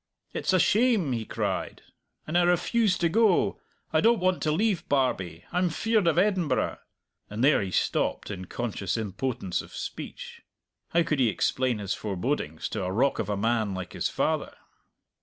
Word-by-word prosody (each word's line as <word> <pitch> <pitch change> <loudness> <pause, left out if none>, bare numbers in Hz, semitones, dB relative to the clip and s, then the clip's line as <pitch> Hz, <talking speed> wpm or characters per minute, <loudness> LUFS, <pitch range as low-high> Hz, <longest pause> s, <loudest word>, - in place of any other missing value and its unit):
"It's - - 0
a 185 - +4
shame!" 215 - +3
he 115 -3 -2
cried. - - -3 0.4
"And 155 - -5
I 175 - +6
refuse 180 +4 +2
to 170 - +2
go. 210 +1 +3 0.3
I 155 - +4
don't 230 +4 +5
want 185 0 +1
to 155 - +1
leave 185 +1 0
Barbie! 95 - 0
I'm 180 0 +1
feared 215 +3 +1
of 165 - +3
Edinburgh," 185 -4 +1 0.5
and 105 +4 -3
there 145 +2 +5
he 95 - -3
stopped 95 - 0
in 95 -2 -6
conscious 100 -2 -3
impotence 110 -1 -2
of - - -13
speech. - - -7 0.5
How 170 0 +3
could 150 -3 -1
he 125 -3 +4
explain 125 +3 0
his 100 -2 -2
forebodings 100 - -3
to - - -3
a 90 - -2
rock 130 +8 +1
of 105 - -2
a 100 - 0
man 110 -2 0
like 95 -1 -6
his - - -1
father? - - -1
140 Hz, 175 wpm, -27 LUFS, -, 0.5 s, I